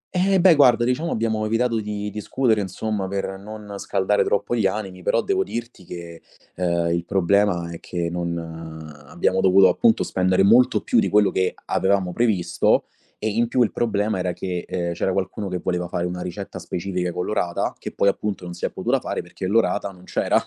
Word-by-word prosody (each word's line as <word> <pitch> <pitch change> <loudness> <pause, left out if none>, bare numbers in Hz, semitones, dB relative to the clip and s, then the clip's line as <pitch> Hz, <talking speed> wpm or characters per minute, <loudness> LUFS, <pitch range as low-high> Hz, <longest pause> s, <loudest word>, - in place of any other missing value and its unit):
Eh 190 +1 +3
beh, 180 -1 +7
guarda 125 -5 +5
diciamo 130 +7 0
abbiamo 110 -1 0
evitato 115 +1 +1
di 105 -1 -4
discutere, 110 +1 0
insomma, 100 +1 -3
per 95 0 -3
non 105 0 -9
scaldare 100 +2 +1
troppo 100 +4 0
gli 105 -4 +2
animi, 95 -2 -4
però - - +1
devo 390 -1 +1
dirti 120 - -7
che, 85 -1 -9 0.3
ehm, 85 -1 0
il 85 0 -1
problema 95 -2 +1
è 85 - -7
che 85 -1 -3
non 85 -1 -2 0.7
abbiamo 95 +6 0
dovuto 95 0 +6
appunto 110 +5 +3
spendere 95 +1 +2
molto 120 +5 +5
più - - +2
di - - +1
quello 105 -1 +4
che 95 0 0
avevamo 95 -2 +1
previsto 110 -7 +2 0.3
e 110 - -2
in 115 +3 +1
più 125 +1 +3
il - - 0
problema 110 -3 0
era 90 -1 -1
che, 90 -2 -4
ehm, 85 -1 -2
c'era 95 +2 -1
qualcuno 100 +2 -2
che 90 -1 -2
voleva 90 -1 -1
fare 85 0 -2
una 90 0 -4
ricetta 95 +3 -6
specifica 90 -1 -3
con 90 +1 -3
l'orata, 90 -5 -1
che - - -6
poi 100 - +1
appunto 100 -2 -3
non 90 - -6
si 85 - -4
è - - 0
potuta - - 0
fare - - -4
perché 95 - -6
l'orata 105 -1 +1
non 90 -2 -15
c'era. - - +1
100 Hz, 195 wpm, -23 LUFS, 90-110 Hz, 0.7 s, beh